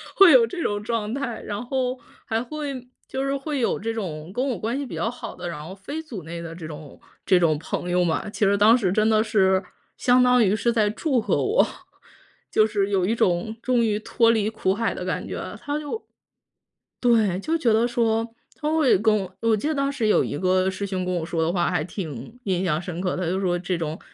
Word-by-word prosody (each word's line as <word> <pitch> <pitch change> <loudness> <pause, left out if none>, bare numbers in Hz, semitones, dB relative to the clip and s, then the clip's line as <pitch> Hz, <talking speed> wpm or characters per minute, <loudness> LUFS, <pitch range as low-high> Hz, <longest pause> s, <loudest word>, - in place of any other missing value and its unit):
会 390 -3 +8
有 245 -5 +7
这 345 +9 -5
种 205 0 -1
状 220 -1 -2
态。 265 -4 -3
然 205 +3 -5
后 255 0 -1 0.3
还 225 0 -1
会 275 -1 -5 0.2
就 265 +1 -2
是 275 0 0
会 280 +1 -3
有 240 - +1
这 225 +2 -3
种 170 -7 -5
跟 255 +5 0
我 245 - -1
关 230 +4 -2
系 285 - -3
比 - - -7
较 225 - -1
好 245 - -8
的， 175 - -5
然 150 -3 -6
后 185 +4 -8
非 285 +11 -6
组 235 - -8
内 170 +2 -6
的 165 -1 -7
这 165 -2 -8
种 150 -2 -10 0.3
这 185 - +5
种 160 -3 +3
朋 175 +2 -4
友 180 0 +2
嘛， 170 +5 -1
其 210 - 0
实 200 +1 +4
当 215 +4 +6
时 195 -7 0
真 215 +2 +3
的 215 -1 +4
是 190 -3 +3 0.4
相 250 0 +4
当 250 0 +5
于 200 0 +3
是 235 +3 +1
在 215 -3 +2
祝 260 +4 0
贺 - - +1
我。 430 +4 +3 0.8
就 215 - +4
是 205 -2 0
有 190 -3 +1
一 215 - +1
种 185 -1 +1
终 250 -2 +2
于 210 -1 0
脱 230 +1 +3
离 215 -2 +1
苦 215 -4 0
海 225 +3 -1
的 - - -6
感 - - -3
觉。 - - -5
他 290 +1 -2
就 305 +10 -6 1.0
对， 220 -7 +3
就 320 +11 0
觉 240 -9 +2
得 225 +2 +3
说 230 -2 +1 0.3
他 300 0 -2
会 315 -5 +4
跟 215 +1 +3
我 190 -2 -5
我 230 -1 +3
记 215 - -2
得 315 - +1
当 275 0 0
时 240 -6 -1
有 210 - +4
一 - - -3
个 185 +1 +2
师 195 +1 -4
兄 185 -1 -2
跟 180 - -1
我 165 -2 -2
说 165 0 -1
的 160 - +1
话 175 -1 +1
还 175 -4 0
挺 160 - -7
印 185 -2 0
象 165 -4 +1
深 175 -1 -5
刻 185 -1 -1
的， 185 - -2
他 - - -1
就 185 +2 0
说 175 -2 +1
这 180 +1 -2
种 160 -1 -4
215 Hz, 260 characters per minute, -24 LUFS, 185-245 Hz, 1.0 s, 会